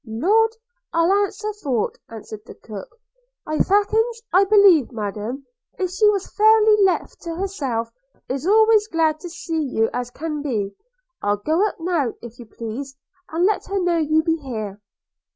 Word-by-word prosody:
'Lord! 410 - +2 0.4
I'll 335 +3 +3
answer 410 +1 -1
for't,' 250 -6 -1
answered 220 -1 -9
the - - -11
cook; 215 - -10 0.5
'ifackins, 435 +8 +1
I 380 +2 +6
believe 390 - +5
Madam, 220 +4 -5 0.3
if 370 -2 -2
she 420 +3 +4
was 400 -2 0
fairly 430 0 +5
left 380 -2 0
to 335 -2 -5
herself, 280 -12 -3 0.4
is 270 +5 -3
always 435 0 +5
as - - -35
glad 315 -2 +1
to 350 - -8
see 340 -1 -3
you 225 -6 0
as 245 -1 -3
can 300 +3 -5
be 215 -9 -2 0.3
– - - -54
I'll 205 0 +1
go 320 - +1
up - - -8
now, 325 -8 0
if 235 +1 -11
you 240 - -10
please, 250 +6 -7 0.3
and 335 +3 +1
let 420 +1 +1
her 395 0 -1
know 350 -2 +1
you 315 0 +2
be 325 0 +1
here.' 215 -8 -6
325 Hz, 170 wpm, -22 LUFS, 245-400 Hz, 0.5 s, I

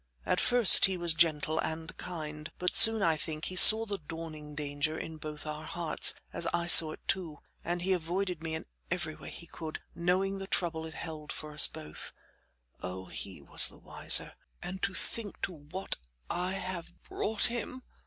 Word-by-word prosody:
At - - -1
first 245 -6 +8
he 190 -2 -2
was 170 -2 +2
gentle 160 -2 0
and 160 +3 -6
kind, 155 -3 -9
but 180 0 -2
soon, 225 -2 +7
I 160 -2 +1
think, 155 0 -6
he 185 - -6
saw 220 +4 +10
the 205 -2 -6
dawning 155 -1 -10
danger 150 +1 -4
in 160 -1 -8
both 155 0 -9
our 155 0 -8
hearts, 170 -2 +1 0.2
as 170 - 0
I 170 0 -2
too - - -10
saw 160 -2 +9
it, 165 -5 -5 0.2
and 175 +1 -4
he 190 +1 0
avoided 180 0 -4
me 160 -1 -5
in - - -7 0.2
every - - -5
way - - -12
he - - -11
could, 160 -1 -9
knowing 185 +3 -2
the 195 - -8
trouble 160 -4 -3
it 160 - -12
held 155 -2 -9
for 155 - -9
us 150 - +6
both. 75 0 -10 0.7
Oh! 95 +1 -8
he - - -8
was - - +2
the - - -13
wiser - - -1 0.3
and 185 +1 -8
to 200 -1 -3
think 220 -4 -5
to - - -3
what 160 +5 -7 0.3
I 180 +1 -4
have 185 -3 -8
brought 220 0 -4
him. 245 +2 -6
165 Hz, 185 wpm, -29 LUFS, 155-185 Hz, 0.7 s, saw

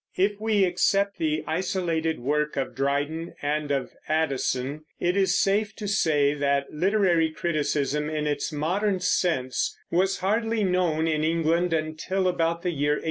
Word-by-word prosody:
If 200 +2 +1
we 215 -2 +2
except 195 +3 +1
the 155 -1 0
isolated 165 -2 -1
work 150 +3 0
of 135 - -2
Dryden 145 +4 -2
and 150 0 -1
of 135 -2 -1 0.2
Addison, 145 -2 -1 0.2
it 175 +1 +1
is 195 -1 +2
safe 205 +2 +1
to 210 - -5
say 150 -8 +2
that 140 -1 0
literary 175 -1 +2
criticism, 150 -2 -1
in 155 -1 -2
its 150 +2 -1
modern 185 +7 0
sense, 170 -8 0
was 190 +3 +2
hardly 220 +3 +1
known 180 -4 +1
in 155 -1 0
England 165 +2 +1
until 160 +4 -1
about 170 -1 0
the 180 - 0
year 145 -1 +1
1825. - - -1
160 Hz, 150 wpm, -26 LUFS, 150-185 Hz, 0.2 s, we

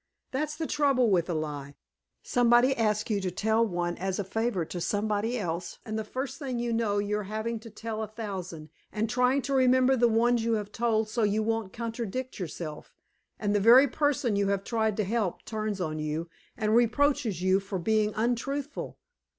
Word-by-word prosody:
That's 300 +3 -2
the 320 +1 -3
trouble 275 -7 +2
with 175 -2 +2
a 170 - 0
lie; 145 -2 -4 0.5
somebody 245 +2 +4
asks 215 -1 0
you 205 -2 +1
to 185 - -1
tell 220 +5 +1
one 175 -4 -2
as 190 0 -2
a 205 - -1
favor 210 -2 -1
to 175 +2 -6
somebody 210 +5 0
else, 175 -4 -4
and 215 - -4
the 220 - -1
first 260 +7 -5
thing 260 -5 -3
you 235 0 -1
know, 225 -3 +1
you 205 +1 0
are 210 - -5
having 220 +3 -3
to 230 - -11
tell 220 0 -5
a 220 - -3
thousand, 190 -7 -6 0.2
and 220 +1 -1
trying 250 +3 +2
to 275 +2 -2
remember 260 0 +4
the 240 -1 +4
ones 235 +1 +2
you 230 0 +1
have 210 -2 -2
told 220 -1 +1
so 225 +2 -2
you 215 0 +2
won't 225 -3 -1
contradict 235 +2 -4
yourself, 160 -3 -6 0.4
and 205 -1 -1
the 205 - +3
very 240 +7 +7
person 285 -4 +1
you 200 0 +1
have 200 0 0
tried 220 -2 0
to 215 - +1
help 210 -2 -2
turns 215 -2 -3
on 155 -3 -2
you 155 +2 -3 0.3
and 215 -1 +1
reproaches 240 - +2
you 190 +1 +4
for 195 0 -4
being 215 +3 +1
untruthful! 255 +6 -2
220 Hz, 195 wpm, -28 LUFS, 195-240 Hz, 0.5 s, very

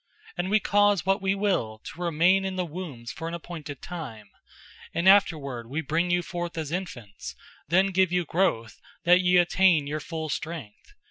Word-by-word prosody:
And 180 0 -2
We 215 +2 +4
cause 205 -3 +3
what 195 +2 +2
We 195 0 +1
will 190 - 0
to 175 - -9
remain 175 +3 +3
in 190 -1 -3
the 180 -1 -1
wombs 150 -8 -7
for 165 - -6
an 165 - -4
appointed 160 -5 -8
time, 125 - -8 0.6
and 170 +3 +1
afterward 140 - +3
We 150 +5 -2
bring 165 +4 0
you 175 0 +1
forth 175 0 -5
as 155 -2 -4
infants, 135 - -6 0.3
then 190 +5 +3
(give 185 -1 +2
you 180 -1 +1
growth) 160 - -1 0.2
that 180 +2 +5
ye 180 0 +4
attain 175 -3 +4
your 150 +2 -3
full 160 0 -5
strength. 155 -9 -6
170 Hz, 180 wpm, -26 LUFS, 150-185 Hz, 0.6 s, that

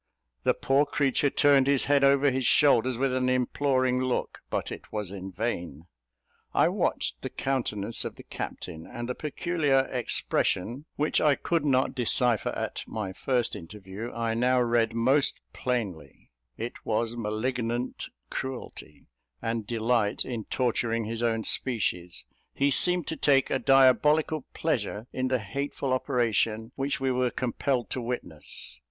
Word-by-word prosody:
The - - +2
poor 140 +2 +2
creature 140 0 +2
turned 140 -2 +4
his 140 -2 +3
head 140 -1 +3
over 140 0 +5
his 130 -1 0
shoulders 130 -4 +4
with 135 0 +1
an 130 0 +1
imploring 130 0 +1
look, 130 -1 -1
but - - -2
it - - -9
was 105 -3 -4
in 95 -1 -7
vain. 90 - -4 0.7
I - - +5
watched - - -1
the - - -4
countenance 115 -5 -2
of - - -5
the - - -12
captain, 80 -2 -7
and 120 0 -6
the 125 - -1
peculiar 150 -2 +1
expression, 125 0 -1
which 150 +1 +1
I 150 -2 +4
could 170 +2 0
not 130 -3 +2
decipher 120 -2 +2
at - - -4
my 105 -4 -4
first 125 +3 0
interview, 100 +5 -8
I 115 -1 -1
now 125 +2 +3
read 115 -2 +2
most 130 +5 +3
plainly: 100 - -4 0.3
it 115 +2 -6
was 115 +1 -1
malignant 120 +2 -2 0.2
cruelty, 130 -2 -6 0.3
and 115 - -3
delight 115 -2 +1
in 115 -4 -4
torturing 115 -2 0
his 115 +1 -4
own 115 -2 +1
species; 90 -10 -1 0.3
he 140 +1 +2
seemed 180 +4 +3
to 160 - -3
take 135 -3 +3
a 135 - +1
diabolical 145 +3 +4
pleasure 110 -8 -1
in 130 0 -1
the 130 0 +2
hateful 135 +4 -3
operation 115 -3 0
which 135 -1 -1
we 135 -1 +1
were 125 0 +1
compelled 125 0 -1
to 130 - -2
witness. 90 - -5
125 Hz, 145 wpm, -28 LUFS, 115-135 Hz, 0.7 s, over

